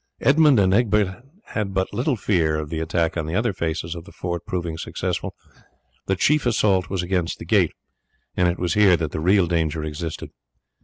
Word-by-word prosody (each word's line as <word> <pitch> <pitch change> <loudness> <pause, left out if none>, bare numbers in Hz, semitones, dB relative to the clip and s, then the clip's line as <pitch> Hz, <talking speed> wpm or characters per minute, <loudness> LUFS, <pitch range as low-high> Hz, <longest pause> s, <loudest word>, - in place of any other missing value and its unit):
Edmund 145 -1 +5
and 95 -1 +3
Egbert 105 -1 +1 0.3
had 100 -3 -3
but 95 +1 -1
little 125 +6 0
fear 85 -7 +1
of 75 -1 -4
the 80 - -2
attack 80 0 0
on 80 -2 -2
the 80 - -3
other 110 0 +1
faces 85 -1 -3
of 85 -1 -9
the 100 - -13
fort 85 0 -5
proving 85 -5 -3
successful; - - -3 0.7
the 95 - +1
chief 145 +7 +2
assault 100 -5 +2
was 95 -2 -2
against 90 -2 -1
the - - -9
gate, - - +2 0.6
and 90 - +3
it 85 +1 0
was 90 -1 -1
here 100 -4 +5
that 80 -3 -3
the - - -3
real 95 +3 +3
danger 80 -2 -1
existed. 75 +1 -5
90 Hz, 195 wpm, -23 LUFS, 85-105 Hz, 0.7 s, Edmund